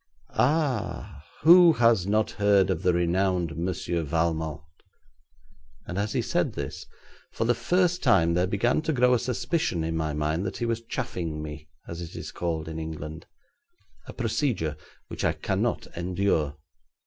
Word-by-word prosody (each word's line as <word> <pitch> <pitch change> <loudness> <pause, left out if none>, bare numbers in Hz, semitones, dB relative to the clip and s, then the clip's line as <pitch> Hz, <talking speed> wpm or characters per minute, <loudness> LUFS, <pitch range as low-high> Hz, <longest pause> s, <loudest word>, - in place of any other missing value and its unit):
'Ah! 130 - 0 0.2
who 170 +1 +8
has 115 - +3
not 110 +1 +1
heard 100 -2 +3
of - - -2
the 90 - +3
renowned 90 -1 +1
Monsieur 85 0 -2
Valmont,' 80 -1 -1 1.2
and 90 - -4
as 105 +1 -1
he - - 0
said - - 0
this, - - -6 0.4
for - - -2
the 120 - +3
first 180 +4 +1
time, 85 0 +4
there 90 +2 +2
began 110 +9 +1
to 160 - -1
grow 125 -1 +4
a 125 - +3
suspicion 130 - -1
in 80 0 -2
my 80 -1 -1
mind 75 +4 -1
that 100 - -4
he 120 - -2
was 115 -1 -1
chaffing 85 -8 -4
me, 75 0 -8 0.2
as 85 +1 -6
it 85 - -8
is - - -6
called 80 -2 -3
in 80 0 -5
England 80 0 -7 0.8
a - - -8
procedure 100 - -1 0.3
which - - -6
I - - +2
cannot - - -1
endure. 85 -4 0
90 Hz, 160 wpm, -26 LUFS, 80-115 Hz, 1.2 s, who